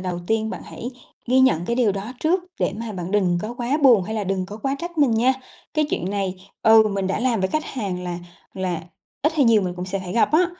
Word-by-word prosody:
đầu 180 -1 -3
tiên 220 0 0
bạn - - -6
hãy 245 - -7 0.4
ghi 260 +2 +4
nhận 175 -10 +4
cái 235 +4 -1
điều 225 -6 +3
đó 200 +5 -5
trước, 350 +4 +2 0.2
để - - +1
mà 225 -1 -5
bạn 180 -1 -5
đừng 185 -4 +2
có 225 +3 -4
quá 245 +4 0
buồn 240 -8 +7
hay 220 +4 -4
là 210 -2 -1
đừng 185 -1 -1
có 210 - -8
quá 270 +5 -1
trách 345 0 -6
mình 285 -4 +5
nha. 230 +4 +3 0.4
Cái 305 0 +3
chuyện 180 - -1
này, 195 -2 -1 0.3
ừ, 220 0 +8
mình 195 -2 -1
đã 190 - -1
làm 240 -5 +1
với 190 - +1
khách 310 +7 -1
hàng 195 -7 -4
là 175 -1 -3 0.4
là 180 -4 -2 0.4
ít 305 +3 +3
hay 290 - +4
nhiều 225 -4 +5
mình 180 -1 -2
cũng 180 0 -5
sẽ 195 +1 -2
phải 180 -1 -6
gặp 235 - +2
á. 345 +3 +5
215 Hz, 260 wpm, -23 LUFS, 190-250 Hz, 0.4 s, ừ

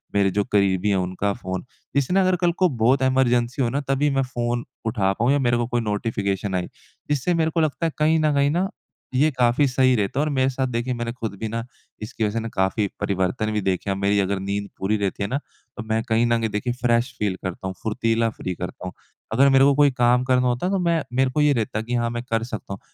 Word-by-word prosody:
मेरे 100 -1 +4
जो 105 +2 +1
करीबी 100 -1 +2
है 100 - +3
उनका 95 +2 -1
फ़ोन 95 -1 -5 0.3
इससे 140 +4 +1
ना 195 - +4
अगर 185 -1 +3
कल 175 -1 +3
को 185 - +5
बहुत 130 +3 +4
इमरजेंसी 125 -1 +2
हो 120 - +2
ना 135 +4 -1
तभी 140 +2 +2
मैं 135 0 +1
फ़ोन 120 -2 -2 0.2
उठा 105 -4 +1
पाऊँ 120 +6 +1
या 145 - +3
मेरे 120 -3 +2
को 120 - 0
कोई 120 0 0
नोटिफ़िकेशन 100 -2 -2
आई, 90 -1 -1 0.4
जिससे 145 +4 +1
मेरे 160 -1 +1
को 165 - 0
लगता 155 +2 0
है 165 - 0
कहीं 160 +1 +3
न 155 -1 +2
कहीं 140 0 +3
ना 180 +4 0 0.5
ये 145 +4 +4
काफ़ी 125 +2 +2
सही 130 0 +3
रहता 105 +4 -1
है 150 - +2
और - - -1
मेरे 130 -1 +2
साथ 130 0 -1
देखिए 125 +1 -2
मैंने 120 -1 -3
ख़ुद 115 -4 -5
भी 110 - -3
ना 115 +1 -3 0.4
इसकी 110 +1 -4
वज़ह 105 +2 -1
से 115 - -5
काफ़ी 95 +2 +1
परिवर्तन 100 +3 0
भी 105 -1 -1
देखे 95 +1 -1
हैं। 95 - +1
मेरी 100 +1 +2
अगर 100 0 0
नींद 100 +1 -3
पूरी 105 +3 +1
रहती 100 0 -2
है 100 - -2
ना 135 - 0 0.4
तो 120 - -4
मैं 110 0 +1
कहीं 110 +1 +3
न 120 0 +2
कहीं 110 -1 -1
देखिए 115 +4 -2
फ्रेश 120 +1 +2
फ़ील 100 -3 0
करता 95 0 -4
हूँ 95 - -5
फुर्तीला 115 +1 +1
फ्री 90 -5 -5
करता 90 0 -7
हूँ। - - -7 0.4
अगर 135 +4 +5
मेरे 135 0 +5
को 140 0 +4
कोई 145 -1 +5
काम 125 0 +3
करना 125 -1 +2
होता 125 +9 0
तो 195 0 0
मैं 170 -2 +1 0.2
मेरे 130 -1 +2
को 150 - +1
ये 150 -1 +4
रहता 110 -3 -1
कि 120 +2 -5
हाँ 120 -1 +1
मैं 120 0 -4
कर 115 0 +1
सकता 110 -4 -6
हूँ। 100 - -7
120 Hz, 250 wpm, -23 LUFS, 105-135 Hz, 0.5 s, को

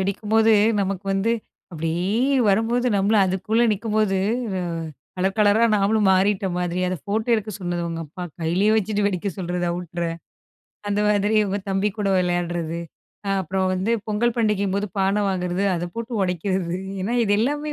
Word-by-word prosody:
வெடிக்கும்போது, 215 +3 +2 0.3
நமக்கு 195 0 -2
வந்து 200 +4 +1 0.4
அப்பிடியே 165 +3 -2 0.4
வரும்போது 230 +5 +2
நம்மளும் 200 +1 +3
அதுக்குள்ள 215 +5 0
நிக்கும்போது, 210 -1 0 0.4
அ - - -2 0.6
கலர் 190 +3 0
கலரா 210 +2 +4
நாமளும் 205 0 +2
மாறிட்ட 190 +1 +2
மாதிரி. 180 0 -1
அத 185 - -2
ஃபோட்டோ 215 +3 -2
எடுக்க 215 -1 -2
சொன்னது 175 -1 -2
உங்க 165 0 -4
அப்பா 180 +5 -9 0.2
கையிலே 175 +6 +1
வச்சுட்டு 210 0 0
வெடிக்க 200 0 -1
சொல்றது. 175 -1 -2
அவுட்ற 175 0 -4 0.9
அந்த 205 0 0
மாதிரி 210 +1 +2
உங்க 200 +1 -1
தம்பி 195 +2 +1
கூட 200 -1 0
விளையாட்றது, 175 -2 -1 0.5
அ - - -2
அப்புறம் 190 +2 -1
வந்து 190 +4 -1 0.2
பொங்கல் 225 +3 +1
பண்டிகையின்போது 200 -2 +1
பான 195 +2 +2
வாங்குறது 180 0 -1
அத 170 - -3
போட்டு 230 +1 -5
உடைக்கிறது. 180 -1 -1 0.3
ஏன்னா, 220 +6 -1
இது 205 - +1
எல்லாமே 295 +5 -1
195 Hz, 150 wpm, -23 LUFS, 180-215 Hz, 0.9 s, கலரா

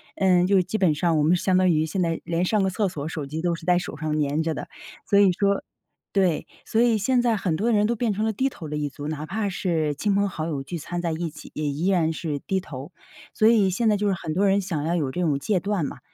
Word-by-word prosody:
嗯， 180 -2 +3
就 195 -1 +4
基 185 +4 -3
本 180 -7 +3
上 165 +1 +1
我 150 - +2
们 165 +4 +4
相 185 +1 +2
当 185 0 +4
于 155 -2 +2
现 170 +4 -2
在 165 -2 -1
连 170 +1 0
上 210 +1 +2
个 190 - +2
厕 200 +2 0
所， 150 -6 -5
手 155 -3 -4
机 155 +4 -5
都 175 0 0
是 165 - -11
在 180 0 +4
手 175 -4 -4
上 155 0 -2
粘 145 +2 0
着 160 0 -1
的， - - -6 0.4
所 200 - +4
以 200 -2 +6
说 200 +2 +1 0.5
对， 185 -6 +1 0.2
所 225 - +1
以 235 -2 +4
现 245 +4 +2
在 240 -2 +2
很 180 -5 -1
多 215 +8 0
人 210 -2 +3
都 235 +2 +1
变 230 -1 0
成 215 +2 -1
了 220 - 0
低 265 +6 0
头 165 -11 -9
的 150 - -4
一 145 -1 -2
族。 145 +1 -7
哪 155 0 -4
怕 205 +2 -2
是 165 -5 -1
亲 200 +8 0
朋 200 0 +2
好 160 -4 -4
友 145 -4 -3
聚 170 +5 -5
餐 175 +3 -4
在 170 -1 -1
一 165 +1 -2
起， 150 - -12
也 155 - -3
依 150 +6 -2
然 170 -4 +2
是 155 -3 -3
低 190 +6 -1
头。 145 -4 -9 0.4
所 215 - +4
以 220 -4 +5
现 205 +6 0
在 210 -1 +3
就 205 +1 0
是 195 - +1
很 155 -3 -5
多 195 +4 +2
人 195 +1 +3
想 175 -7 -3
要 170 +2 0
有 145 -6 -1
这 180 - -3
种 155 -5 +1
戒 185 +7 0
断 200 -3 -1
嘛。 - - -6
180 Hz, 305 characters per minute, -24 LUFS, 155-200 Hz, 0.5 s, 以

